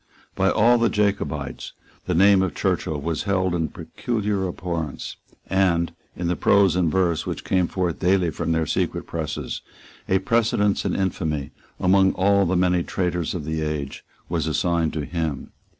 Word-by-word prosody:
By 95 0 +2
all 120 +2 +4
the 115 - +3
Jacobites 100 -9 -2 0.3
the - - 0
name 100 +2 +6
of 95 -5 -1
Churchill 75 -2 -1
was 80 +4 -2
held 95 -3 +1
in 80 -2 0
peculiar 105 -5 -2
abhorrence; 85 -5 -4 0.3
and, 90 -3 +1 0.2
in 85 - -3
the 90 - +1
prose 100 -2 +4
and 85 -3 +2
verse 90 -4 +1
which - - -4
came 90 -2 +1
forth 90 -2 -2
daily 90 -2 +2
from 85 - -2
their 80 -1 +1
secret - - -1
presses, - - -4 0.5
a 95 - +4
precedence 105 -1 +1
in - - 0
infamy, 80 -7 -2 0.3
among 95 +1 +4
all 100 0 +3
the 90 +1 +1
many 90 -1 +3
traitors 90 -1 -2
of 80 -5 -4
the 80 0 -2
age, 75 -3 -4 0.2
was 80 -2 -1
assigned 80 +1 +1
to 75 -2 -3
him. 80 -3 -3
90 Hz, 165 wpm, -23 LUFS, 80-95 Hz, 0.5 s, name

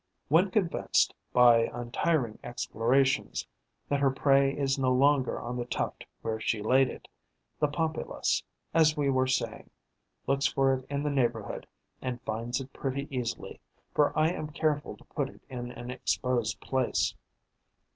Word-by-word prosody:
When 170 +7 +5
convinced, 185 -3 +2 0.2
by 120 -2 +6
untiring 120 0 -1
explorations, 125 +3 +1 0.4
that 140 - +1
her 140 -1 +4
prey 135 +1 +3
is 135 -1 +1
no 130 -1 +2
longer 135 +1 +3
on 120 +2 -4
the 120 - -2
tuft - - -3 0.2
where 110 -1 -2
she 110 0 0
laid 130 +4 +4
it, - - -9 0.5
the 150 - +3
Pompilus, 160 +1 -1 0.3
as 155 -1 +4
we 140 -2 +2
were 130 0 +2
saying, 130 - -2 0.6
looks 135 +1 +2
for 135 -1 +2
it 130 0 -4
in 140 0 -2
the 150 - 0
neighbourhood 130 -4 -1 0.3
and 125 -1 -3
finds 115 +4 -2
it 135 0 -8
pretty 140 +1 -3
easily, 120 -2 -4 0.3
for 150 - +3
I 155 +1 +4
am 155 -3 -3
careful 150 -1 -1
to - - -18
put 140 -3 -3
it - - -17
in 120 -2 -5
an 125 0 -7
exposed 125 -2 -1
place. 130 -2 0
135 Hz, 155 wpm, -29 LUFS, 125-145 Hz, 0.6 s, by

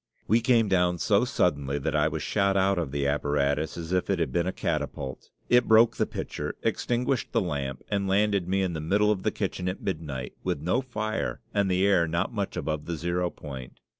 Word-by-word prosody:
We 115 +2 +4
came 115 -2 +3
down 90 -2 +2
so 105 +5 +3
suddenly 70 - 0
that 70 - -2
I 75 0 +3
was 80 - -3
shot 100 -1 +1
out 95 -1 +3
of 80 -5 -2
the 70 0 -1
apparatus 70 +1 0
as 85 0 -6
if 90 +1 0
it 100 - +2
had 85 - -1
been 85 0 0
a - - +1
catapult; 65 -7 -3 0.2
it 125 0 +4
broke 110 +1 +5
the - - +1
pitcher, - - -5
extinguished 125 +1 0
the - - +4
lamp, 70 -7 -3
and 100 -1 -1
landed 100 -1 +2
me 95 +1 +1
in 90 -2 -1
the 80 - -3
middle 105 +6 +2
of 100 -3 -1
the - - +1
kitchen 90 0 -2
at 90 - -4
midnight, 75 -9 -4
with - - -1
no 90 - +1
fire 110 -4 -3
and 100 -2 +2
the 95 +1 +2
air 90 -4 +4
not 85 +8 -1
much 100 -3 -3
above 75 -1 -2
the 85 - -3
zero 85 +2 -1
point. 65 -7 -9
90 Hz, 215 wpm, -27 LUFS, 75-100 Hz, 0.2 s, broke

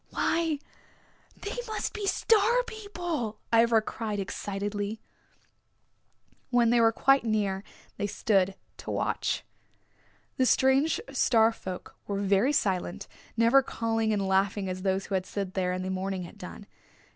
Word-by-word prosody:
"Why, 325 -2 0 0.8
they 410 - -5
must 435 - -3
be 415 -2 -3
Star 460 +4 +3
People," 350 - -4 0.2
Ivra 230 -1 +5
cried 215 -2 -4
excitedly. 205 +2 -3 1.5
When 240 -2 +4
they 240 -1 +4
were 225 0 +5
quite 270 +4 +3
near 205 -4 0 0.3
they 205 - -1
stood 195 -2 +1 0.2
to - - -8
watch. - - -1 0.9
The 255 - +3
strange 270 +5 +3
Star 230 -4 +4
folk 185 -5 -8
were 200 - -2
very 200 +6 +3
silent, 190 -10 -1 0.3
never 230 +4 +6
calling 225 -3 -1
and 200 -2 0
laughing 195 +1 +1
as 185 0 -4
those 190 0 0
who - - -6
had 185 -1 0
slid 195 -2 -4
there 180 -1 0
in 185 0 -2
the 185 - -3
morning 190 0 -2
had 175 +4 -11
done. 190 +2 -9
215 Hz, 140 wpm, -28 LUFS, 195-260 Hz, 1.5 s, never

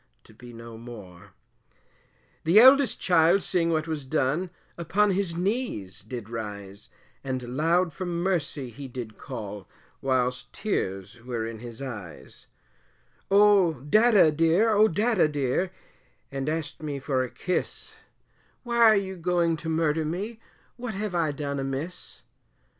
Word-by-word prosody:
to - - -18
be 120 +2 -13
no 115 -1 -10
more. 100 -6 -12 1.1
The 170 +7 +6
eldest 265 0 +6
child 175 +2 +4
seeing 170 -2 +1
what 160 -1 0
was 155 -3 -3
done, 150 +5 0 0.3
upon 200 +5 +1
his 185 -3 -1
knees 175 - -2
did 110 +1 -7
rise, 105 -2 -7 0.3
And 130 -2 -4
loud 165 +3 +2
for 185 - -5
mercy 170 -7 -2
he 140 +4 -8
did 120 -4 -8
call, 105 -7 -7 0.3
whilst 125 -2 0
tears 95 - -3
were 120 -3 -3
in 115 -1 -6
his 120 +2 -8
eyes 105 -10 -9 0.8
Oh, 200 -4 +5
Dadda 215 -3 +5
dear, 165 +8 +3
oh, 215 +1 +5
Dadda 205 -3 +2
dear, 145 +5 0 0.6
and 135 +1 -3
asked 160 0 -3
me 150 -2 -4
for 135 -1 -1
a 130 - -2
kiss, 180 +8 -3 0.7
Why 240 -1 -2
are 225 -2 +7
you 190 -1 -2
going 170 -1 +1
to 160 +1 -5
murder 160 -1 +1
me, 200 +9 -4 0.4
what 240 -3 -5
have 205 -1 -3
I 165 -3 +1
done 140 -1 -4
amiss? 135 +6 -5
155 Hz, 140 wpm, -26 LUFS, 125-185 Hz, 1.1 s, are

